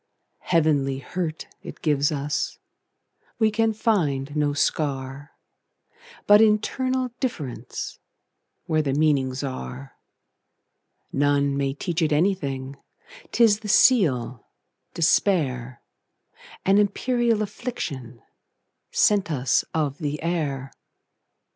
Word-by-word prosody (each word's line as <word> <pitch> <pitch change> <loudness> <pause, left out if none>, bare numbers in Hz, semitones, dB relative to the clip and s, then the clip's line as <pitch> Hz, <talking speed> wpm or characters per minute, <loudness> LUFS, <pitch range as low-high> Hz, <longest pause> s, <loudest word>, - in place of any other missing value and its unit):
Heavenly 150 -5 +1
hurt 160 +4 -4 0.2
it - - -10
gives 145 -2 +2
us; 145 0 -2 0.8
We 220 -1 +3
can 225 +1 +2
find 155 - 0
no 150 -1 +1
scar, 140 -1 -2 0.9
But 205 +1 +7
internal 255 +4 +1
differenceWhere 155 - -5
the 135 -2 -1
meanings 140 -3 +1
are. 135 0 -6 1.2
None 140 0 +2
may 140 -1 -1
teach 170 +3 -2
it 155 -1 +1
anything,'T 155 - -3
is 210 -2 +5
the 215 -1 -7
seal, 145 - +3 0.5
despair,—An 155 - -1
imperial 235 +3 +1
afflictionSent 145 - -5 1.1
us 130 -5 +1
of 150 -3 -1
the 150 0 -3
air. 145 -6 -2
150 Hz, 85 wpm, -24 LUFS, 135-205 Hz, 1.2 s, But